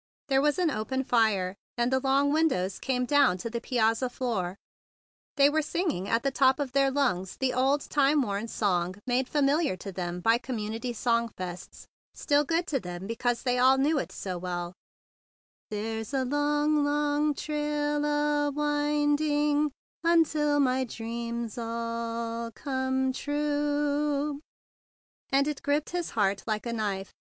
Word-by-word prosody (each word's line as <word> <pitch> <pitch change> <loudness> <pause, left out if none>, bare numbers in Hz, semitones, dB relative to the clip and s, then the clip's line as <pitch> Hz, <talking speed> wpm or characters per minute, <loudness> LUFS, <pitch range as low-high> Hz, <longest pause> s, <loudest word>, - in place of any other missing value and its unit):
There 270 0 +4
was 295 +2 +2
an 350 -4 +2
open 260 +3 -2
fire, 215 -7 +2 0.2
and 240 +2 +1
the 265 - +3
long 275 +2 +2
windows 260 - +1
came 250 -2 -1
down 280 -8 +4
to 225 +5 -5
the 235 0 -3
piazza 235 0 +1
floor. 210 -8 -2 0.8
They 280 -1 +6
were 310 +2 +2
singing 300 - -2
at 230 - +1
the 275 - +1
top 265 +1 +3
of 280 -3 -2
their 275 +1 +3
lungs, 245 -10 0
the 260 -1 0
old, 270 +3 +2
time 285 0 +2
worn 205 0 -3
song 185 -5 0
made 255 +1 0
familiar 290 - +2
to 195 +2 -7
them 180 -1 -4
by 225 +5 +3
com¬ 250 0 -5
munity 225 +3 -4
sing 235 0 +1
songs, 180 -1 -7 0.3
still 290 0 +2
good 330 +4 0
to 280 -5 -1
them 180 -2 -7
because 235 +2 -1
they 250 -2 +1
all 260 +1 +6
knew 290 +3 +2
it - - -5
so 185 -2 -5
well, 175 -1 -4 0.5
" - - -86
There's 220 +3 -4
a 260 -1 +1
long, 295 +2 +1
long 295 0 +1
trail 295 0 -1
a 295 0 +1
winding 295 0 +1 0.3
Until 310 -3 +3
my 260 -1 +2
dreams 235 -1 -5
all 230 0 -3
come 260 -1 -1
true;" 290 0 -1 0.9
and 275 +1 +3
it 300 -2 -3
gripped 290 +1 0
his 350 -1 -2
heart 200 -2 +2
like 215 0 -2
a 235 - -2
knife. 200 -4 -3
265 Hz, 155 wpm, -28 LUFS, 230-290 Hz, 0.9 s, They